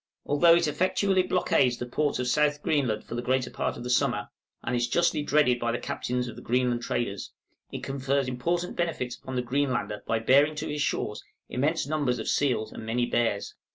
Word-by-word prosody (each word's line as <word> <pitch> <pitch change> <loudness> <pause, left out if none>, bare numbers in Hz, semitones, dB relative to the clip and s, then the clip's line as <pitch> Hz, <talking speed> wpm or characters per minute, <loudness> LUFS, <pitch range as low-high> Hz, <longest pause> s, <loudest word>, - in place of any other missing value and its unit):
Although 165 +4 +5
it 170 -1 +2
effectually 185 +4 +2
blockades 175 -9 +2
the 125 - -4
ports 145 +4 0
of 125 0 -2
South 150 +3 +2
Greenland 130 -8 0
for - - -9
the 120 - -2
greater 130 0 0
part - - -2
of - - -7
the 125 - -5
summer, - - +1 0.3
and 125 - -1
is 120 0 +1
justly 170 -3 +2
dreaded 145 -4 +3
by 120 0 0
the 120 - -1
captains 125 0 -3
of 120 - -7
the - - -10
Greenland 125 0 +1
traders, 115 -4 -3 0.4
it - - -6
confers 135 0 -1
important 170 +8 -2
benefits 145 -8 -2
upon 130 - -7
the 125 - 0
Greenlander 130 -4 -1
by 115 - +1
bearing 140 +7 +4
to 150 +1 -4
his 150 0 -3
shores - - -2 0.3
immense 150 +6 0
numbers 145 -4 0
of 110 - -5
seals 120 -6 +1
and - - -8
many 120 +2 0
bears. 115 -4 0
130 Hz, 200 wpm, -27 LUFS, 120-150 Hz, 0.4 s, Although